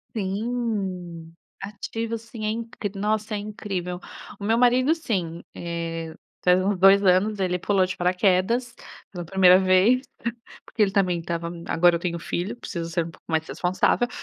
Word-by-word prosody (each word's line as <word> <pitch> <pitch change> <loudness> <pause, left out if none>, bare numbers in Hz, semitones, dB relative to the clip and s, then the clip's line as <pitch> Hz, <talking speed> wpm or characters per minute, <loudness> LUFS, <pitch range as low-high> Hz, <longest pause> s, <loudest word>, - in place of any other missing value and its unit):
Sim. 195 -6 -3 0.3
Ativo, 225 +3 -4
sim. 225 -1 -9 0.4
É - - -1
in 200 - -3
nossa, 215 +1 -1
é 210 - -1
incrível. 195 -4 -5 0.4
O 200 - -5
meu 225 +2 +2
marido, 250 +4 +4
sim. 180 - -3
Eh, 165 -1 -4 0.3
faz 180 +1 +4
uns 200 -2 0
2 195 +2 +6
anos 195 +3 +3
ele 180 -1 0
pulou 195 -1 +2
de 185 - -5
paraquedas, 190 +6 +1 0.4
pela 175 -3 -6
1º 185 +1 +6
vez. 190 +7 +4 0.6
Porque 220 - -1
ele 200 - +3
também 185 -3 +1
estava 170 0 -4 0.2
"Agora 175 +1 +4
eu 170 - -5
tenho 170 -1 -2
filho, 180 +6 -3
preciso 170 -7 -5
ser 170 0 0
um 165 - -8
pouco - - -21
mais 160 0 0
responsável". 185 +6 +1
190 Hz, 160 wpm, -24 LUFS, 175-215 Hz, 0.6 s, 2